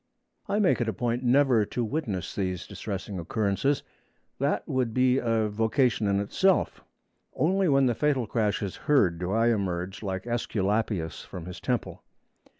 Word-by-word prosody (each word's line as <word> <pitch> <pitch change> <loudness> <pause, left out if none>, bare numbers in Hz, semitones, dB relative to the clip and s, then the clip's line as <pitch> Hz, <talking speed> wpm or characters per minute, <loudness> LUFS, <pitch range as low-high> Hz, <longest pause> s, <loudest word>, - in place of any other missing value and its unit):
I 205 - +1
make 200 - +3
it 115 - 0
a - - -2
point 120 +4 -1
never 130 -2 +4
to 120 +4 -3
witness 110 - -3
these 90 -2 -2
distressing 100 -2 -5
occurrences; 105 - 0 0.6
that 140 +2 0
would 130 -6 -1
be 130 0 +3
a 115 -2 +1
vocation 110 +2 +1
in 100 0 +2
itself. 180 - +1 0.5
Only 190 +2 +2
when 135 -1 +4
the 120 - +2
fatal 135 0 +1
crash 105 -2 0
is 95 - -4
heard 95 - +4
do 90 +1 -2
I 115 +2 +3
emerge, 95 -2 -3
like 95 -2 -3
Æsculapius 105 -6 -1
from 85 -3 -8
his 90 0 -8
temple. - - -2
110 Hz, 155 wpm, -27 LUFS, 100-130 Hz, 0.6 s, never